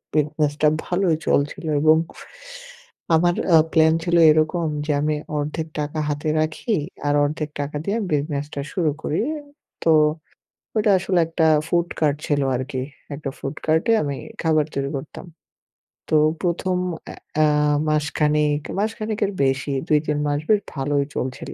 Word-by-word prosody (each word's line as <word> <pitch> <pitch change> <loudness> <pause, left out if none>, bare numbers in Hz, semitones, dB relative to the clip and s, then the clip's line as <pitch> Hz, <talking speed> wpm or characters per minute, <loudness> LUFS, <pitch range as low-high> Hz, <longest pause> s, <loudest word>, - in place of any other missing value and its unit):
বিজনেসটা 150 0 +1 0.2
ভালোই 175 -2 +1
চলছিল 145 +3 0 0.2
এবং 155 0 +6 1.2
আমার 175 +2 +3 0.2
আ - - +9 0.2
প্লান 160 0 +5
ছিল 170 -1 +1 0.2
এরকম 155 +2 +1 0.2
যে 155 - 0
আমি 150 0 +1 0.2
অর্ধেক 155 +2 -3
টাকা 150 +1 -3
হাতে 150 +1 -2
রাখি 155 +8 -1 0.3
আর 145 - +2
অর্ধেক 150 +1 -2
টাকা 145 +1 -4
দিয়ে 200 +3 0 0.2
বিজনেসটা 145 -1 -2
শুরু 165 -5 +1
করি। 155 - 0 0.6
তো 165 - +4 0.8
ওইটা 215 -1 +3
আসলে 185 -1 +1
একটা 165 -1 +1 0.2
ফুড 170 0 +1
কার্ট 150 -2 +2
ছিল 145 -1 +1
আরকি। 130 0 -3 0.3
একটা 140 -1 -5
ফুড 135 +2 -5
কার্টে 160 +7 +2
আমি 140 -2 -3 0.3
খাবার 155 -2 +3
তৈরি 140 0 -1
করতাম। 145 +6 -9 0.8
তো 155 - +2 0.3
১ম 180 +1 0 0.3
এ - - -9 0.3
আ - - +6 0.4
মাসখানেক, 150 -1 +1 0.2
মাসখানেকের 215 -1 -1
বেশি 135 +1 0
২-৩ 150 -1 +1
মাস 145 0 0
বেশ 210 -1 +4
ভালোই 140 0 0
চলছিল। 130 0 -4
155 Hz, 135 wpm, -22 LUFS, 145-170 Hz, 1.2 s, আ